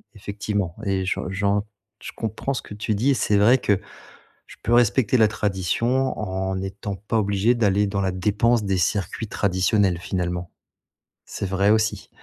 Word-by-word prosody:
effectivement, 100 -3 -3
et 95 -1 0
j'en 95 - -1
j'en 100 +1 0 0.4
je - - -6
comprends 110 +5 -3
ce 130 - -3
que - - -11
tu 105 +1 -2
dis, 120 +7 +2
et - - +4
c'est 105 -3 +1
vrai 110 +6 +5
que 100 -6 +1 0.7
je - - -14
peux 120 - +1
respecter 120 +1 +3
la 110 -3 +5
tradition, 110 +6 0
en 95 -2 -2
n'étant 95 +1 -5
pas 105 +4 -3
obligé 100 +3 +2
d'aller 105 -3 +2
dans 100 0 -1
la 95 - +1
dépense 105 +5 +1
des 95 -1 0
circuits 95 +4 -1
traditionnels 95 -1 +1
finalement. 90 -1 -3 0.8
C'est - - -5
vrai 95 +1 +1
aussi. 110 0 +1
100 Hz, 165 wpm, -23 LUFS, 95-110 Hz, 0.8 s, vrai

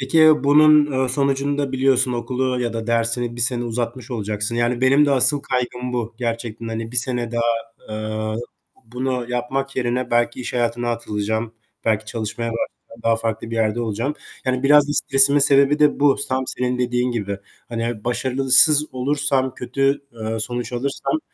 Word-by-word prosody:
Peki, 130 +4 -2
ya, 155 -2 +6
bunun, 150 +1 +6
eee, 130 0 0
sonucunda 140 +1 -1
biliyorsun 130 -1 +2
okulu 125 +1 -2
ya 120 -1 -2
da 115 -1 -5
dersini 115 +1 0
1 - - -5
sene 120 +1 +1
uzatmış 120 +1 -4
olacaksın, 105 -1 -3
yani 120 +1 0
benim 135 +3 +4
de - - +1
asıl 135 +2 +4
kaygım 125 -1 -3
bu 120 -1 -3
gerçekten, 115 -1 -4
hani, 115 +1 -5
1 - - -4
sene 120 -1 -1
daha, 120 0 0 0.5
eee, 110 0 -3 0.4
b - - -26
bunu 125 +1 -3
yapmak 135 +2 -3
yerine 125 0 -1
belki 120 +2 +1
iş 125 - -5
hayatına 120 0 -1
atılacağım, 110 0 -3 0.3
belki 110 -1 +1
çalışmaya 115 +1 -4
başlasam 115 0 -7
daha 115 0 +2
farklı 115 0 -4
bir - - -4
yerde 110 +1 0
olacağım. 115 +5 -2 0.3
Yani, 130 0 -1
biraz 145 +1 +5
da - - 0
stresimin 140 0 +4
sebebi 140 +1 +4
de 150 -1 +3
bu, 145 -1 +4
tam 130 0 -1
senin 125 0 -2
dediğin 125 0 0
gibi. 100 -4 -3 0.3
Hani, 115 -2 -4
başarısız 135 +4 +4
olursam, 135 0 0
kötü, 135 +2 0
eee, 110 -1 -4
sonuç 120 +2 -4
alırsam 135 - -2
125 Hz, 170 wpm, -21 LUFS, 115-135 Hz, 0.5 s, ya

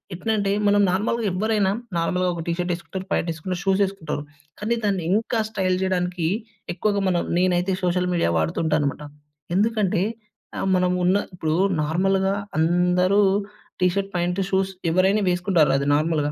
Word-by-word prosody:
ఎట్లంటే, 205 +2 0 0.2
మనం 205 0 +4
నార్మల్‍గా 220 +4 0
ఎవ్వరైనా 205 0 +1 0.3
నార్మల్‌గా 180 +2 0
ఒక 170 - -4
టీ - - +1
షర్ట్ 180 0 -1
ఏసుకుంటారు, 185 +2 -7
ప్యాంట్ 170 - 0
ఏసుకుంటరు, 175 +3 -5
షూస్ 195 +1 +2
ఏసుకుంటారు. 170 -6 -5 0.4
కానీ 220 +3 0
దాన్ని 195 -4 0
ఇంకా 225 +2 0
స్టైల్ 190 -4 0
చేయడానికి 180 -2 -1 0.5
ఎక్కువగా 205 +1 0
మనం 175 -2 +1 0.2
నేనైతే 180 +1 +1
సోషల్ 180 0 +1
మీడియా 170 - +1
వాడుతు 80 0 -1
ఉంటానమాట. 150 -2 0 0.5
ఎందుకంటే 210 -3 +1 0.6
ఆహ్, - - -2
మనం 180 0 +2
ఉన్న 185 +2 +3 0.2
ఇప్పుడు 160 -3 -2 0.3
నార్మల్‍గా 190 +5 +1 0.2
అందరూ 180 +4 +3 0.6
టీ 180 - +5
షర్ట్, 195 0 -2
ప్యాంట్, 175 +2 0
షూస్ 190 0 +1 0.2
ఎవరైనా 190 +4 +3
వేసుకుంటారు 180 -3 +2
అది 140 0 -2
నార్మల్‌గా. 150 -1 0
185 Hz, 145 wpm, -23 LUFS, 175-195 Hz, 0.6 s, టీ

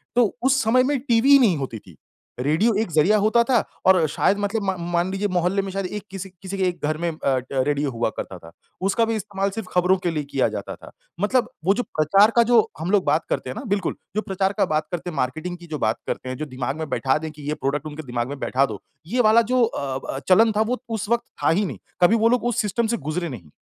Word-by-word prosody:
तो 245 -1 +5 0.2
उस 270 +1 +3
समय 240 +3 +4
में 280 +1 0
टीवी 240 0 +2
ही 280 - +9
नहीं 195 - +3
होती 130 -5 -5
थी। 90 -5 -17 0.4
रेडियो 160 - +2
एक 220 - -3
ज़रिया 165 +7 +4
होता 215 +3 +3
था 255 - +5 0.3
और 185 -4 +5
शायद 200 +6 +1
मतलब 205 +2 -1
म 190 - 0 0.2
मान 175 +1 +1
लीजिए 195 +2 -1
मोहल्ले 180 +2 +1
में 195 - -5
शायद 195 0 -3
एक 205 +3 -5
किसी 195 0 -6
किसी 195 0 -5
एक 175 -2 -3
घर 155 +1 -1
में 170 +1 -1
अ 155 - -10 0.2
अ, 130 - -2
रेडियो 140 +1 0
हुआ 115 -1 -1
करता 95 - -5
था 85 -1 -14 0.3
उसका 200 +5 +2
भी 225 0 -1
इस्तेमाल 200 -1 -2
सिर्फ़ 205 0 -6
खबरों 180 +1 +3
के 175 - +2
लिए 155 -2 -2
किया 135 - +2
जाता - - -6
था। - - -14 0.3
मतलब 245 +4 +2 0.2
वो 195 - +5
जो 245 +4 -1
प्रचार 195 +5 +3
का 235 - +6
जो 235 0 +5 0.2
हम 170 +4 -2
लोग 205 -3 +3
बात 150 +2 +1
करते - - -2
हैं 130 - -5
ना - - -5
बिल्कुल, 200 -3 -1 0.2
जो 215 - +1
प्रचार 195 -1 -1
का - - +3
बात 155 0 -1
करते 175 0 -4
हैं 160 - -8
मार्केटिंग 160 +8 -2
की 175 0 -13
जो 155 -2 -4
बात 110 0 +1
करते 130 - -4
हैं, 130 - -4
जो 155 - -4
दिमाग़ 130 0 -4
में 160 -2 -5
बैठा 130 +2 +1
दें 160 0 -5
कि 150 0 -14
ये 150 - 0
प्रोडक्ट 145 0 -2
उनके 155 +1 -7
दिमाग़ 120 -3 -3
में 145 - -6
बैठा 135 +1 +1
दो, 110 -6 -7 0.3
ये 245 +7 +1
वाला 220 0 +6
जो 255 -1 +4
अ 140 - -2 0.2
अ, - - -3
चलन 220 +5 +6
था - - +3
वो 230 +2 0
उस 220 -2 -3
वक़्त 235 0 +2 0.2
था - - +4
ही 195 +6 +2
नहीं - - -5 0.2
कभी 180 +6 +6
वो 230 0 +3
लोग 250 -1 +2
उस 240 -1 0
सिस्टम 220 +2 0
से 235 +1 0
गुज़रे 155 +3 -3
नहीं। 95 - -9
185 Hz, 265 wpm, -23 LUFS, 150-220 Hz, 0.4 s, ही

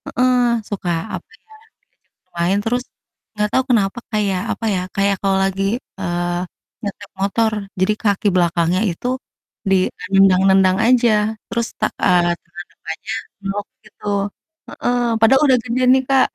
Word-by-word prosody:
heeh, 250 0 +3 0.3
suka 190 -4 -2 0.3
apa - - -35 0.2
ya, 440 - -20 0.3
diajak - - -50
main 175 +4 +2
terus, 245 +3 0 0.5
nggak 210 0 0
tahu 260 - +2
kenapa 205 -2 +2
kayak 200 -4 0
apa 225 - -6
ya, 180 - -1
kayak 200 0 +2
kalau 195 -1 +2
lagi, 195 0 0 0.4
eee, 175 -1 -1 0.4
nyetir 205 0 -6
motor, 220 +3 +1 0.3
jadi 190 +3 +3
kaki 205 -1 +1
belakangnya 175 +1 +2
itu, 175 +8 -4 0.6
di, 195 - +5 0.2
eee, 180 - -10
nendang-nendang 190 0 +5
aja 240 -1 +4 0.4
terus 235 0 -1
tak 215 - +1
eee, 175 -1 +4
tangan - - -10
depannya - - -6 0.3
meluk 200 +1 -3 0.2
gitu, 210 - -17 0.7
heeh, 245 0 -1 0.2
padahal 245 +5 +5
udah 260 -2 +5
gede 250 +1 -1
nih 260 0 +3
Kak. 270 -1 +4
200 Hz, 145 wpm, -19 LUFS, 185-230 Hz, 0.7 s, di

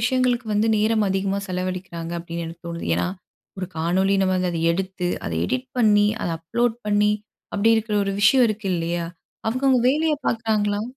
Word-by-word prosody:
விஷயங்களுக்கு 245 0 +1
வந்து 210 +2 +2
நேரம் 215 0 +2
அதிகமா 195 +1 0
செலவழிக்கிறாங்க 180 -2 -4
அப்பிடின்னு 170 0 -5
எனக்கு 165 +1 -10
தோணுது. 170 0 -5
ஏன்னா, 85 - 0 0.5
ஒரு 185 - -3
காணொலி 185 +5 +2
நம்ம 185 -1 +2
அங்க 180 0 0
அத 165 - -2
எடுத்து 185 0 -2 0.2
அத - - -3
எடிட் 130 +5 -2
பண்ணி, 210 -3 +5 0.2
அத - - -1
அப்லோட் 230 +8 0
பண்ணி, 210 0 +3 0.4
அப்பிடி 225 +3 +4
இருக்கிற 220 -1 -1
ஒரு 195 - -2
விஷயம் 250 +5 +6
இருக்கு 215 -1 -4
இல்லயா! 170 0 -2 0.4
அவுங்கவுங்க 255 +2 +2
வேலைய 310 +2 +2
பார்க்குறாங்களா! 210 -3 0
200 Hz, 165 wpm, -23 LUFS, 175-225 Hz, 0.5 s, விஷயம்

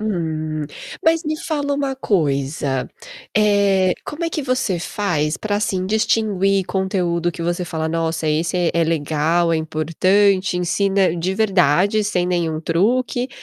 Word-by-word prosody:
Hum, 155 -7 -2 0.4
mas 325 0 +3
me 310 +1 -1
fala 290 -3 -2
uma 280 -1 -1
coisa. 140 - -1 0.5
Eh, 200 -3 +3
como 310 +3 -5
é 330 - 0
que 305 - -3
você 255 -7 0
faz 165 -6 -1
pra 210 -1 -3
assim, 190 -3 -1
distinguir 195 -2 +1
conteúdo 180 -3 -1
que 170 - -9
você 175 +2 -1
fala: 160 -2 -3
"Nossa! 165 0 -1
Esse 160 +3 0
é 175 -2 +2
é 170 - +3
legal, 165 +1 +1
é - - +2
importante, 185 +5 +1
ensina 190 +1 +1
de 175 +3 -1
verdade 195 0 +2
sem 180 -4 0
nenhum 165 -3 -1
truque". 245 +9 0
180 Hz, 145 wpm, -20 LUFS, 165-205 Hz, 0.5 s, mas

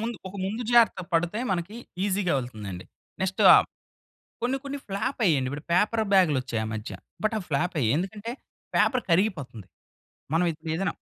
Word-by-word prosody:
ముందు 230 +1 -3
ఒక 200 - -9
ముందు 220 +5 -3
జాగ్రత్త 235 -5 +5
పడితే 170 +5 +1
మనకి 190 +4 -2 0.3
ఈసీ‌గా 195 -2 +1
వెళ్తుందండి. 105 -8 -6 0.4
నెక్స్ట్ 190 0 0
ఆహ్, - - +6 0.8
కొన్ని 250 +3 0
కొన్ని 280 0 -5
ఫ్లాప్ 200 +8 -2
అయ్యాయండి. 140 -8 +3
ఇప్పుడు 145 +2 -6
పేపర్ 215 +4 +2
బ్యాగ్‌లు 180 -8 +5
వచ్చాయి 115 -3 -3
ఆ - - -4
మధ్య. 110 +2 -5 0.3
బట్ 215 - +1
అవి 185 - -5
ఫ్లాప్ 160 +5 0
అయ్యాయి. 120 0 +2
ఎందుకంటే, 205 +6 -4 0.4
పేపర్ 255 -3 +3
కరిగిపోతుంది. 145 - 0 0.7
మనం 170 - +3
ఇప్పుడు 160 +1 -8
ఏదైనా 195 +2 -1
180 Hz, 165 wpm, -26 LUFS, 145-215 Hz, 0.8 s, ఆహ్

